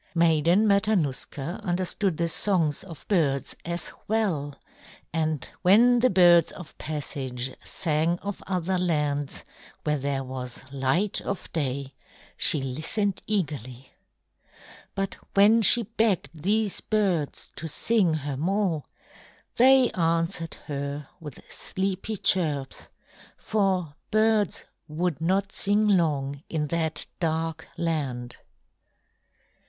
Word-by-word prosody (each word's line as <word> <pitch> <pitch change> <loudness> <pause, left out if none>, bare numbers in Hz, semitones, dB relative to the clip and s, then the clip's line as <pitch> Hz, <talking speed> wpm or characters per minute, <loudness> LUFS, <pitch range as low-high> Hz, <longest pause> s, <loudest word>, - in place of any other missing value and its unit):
Maiden 170 +5 +4
Matanuska 185 -6 0
understood 185 0 -1
the 170 - +1
songs 165 -4 +1
of 165 -7 -12
birds 145 -9 +1
as 170 +1 -4 0.2
well, 175 -11 0 0.6
and 155 -4 -1
when 235 +6 +6
the 255 +2 +4
birds 175 -3 +6
of 175 - -11
passage 135 -4 -4
sang 165 0 0
of 200 0 -5
other 185 0 0
lands, 150 -5 -1 0.4
where 150 -1 0
there 135 0 -2
was 130 -1 -6
light 140 +10 +1
of 200 - -5
day, 140 -3 -2 0.4
she 145 - +2
listened 160 - -1
eagerly. 135 - -3 1.0
But 195 0 -2 0.2
when 210 +3 +6
she 235 +3 +6
begged 220 -5 0
these 200 +6 0
birds 190 -9 -1
to 160 +5 -5
sing 185 0 +2
her 140 -2 -3
more, 180 -1 0 0.7
they 260 0 +6
answered 165 0 -1
her 140 0 -4
with 150 -5 -9
sleepy 195 +3 -3
chirps, 150 -8 0 0.5
for 190 -7 0 0.2
birds 215 -3 +2 0.2
would 160 0 -2
not 190 +3 +1
sing 205 +2 +2
long 145 -7 +1
in 150 -2 -2
that 160 -2 -1
dark 160 -1 -2
land. 135 -8 -2
165 Hz, 110 wpm, -26 LUFS, 145-195 Hz, 1.0 s, when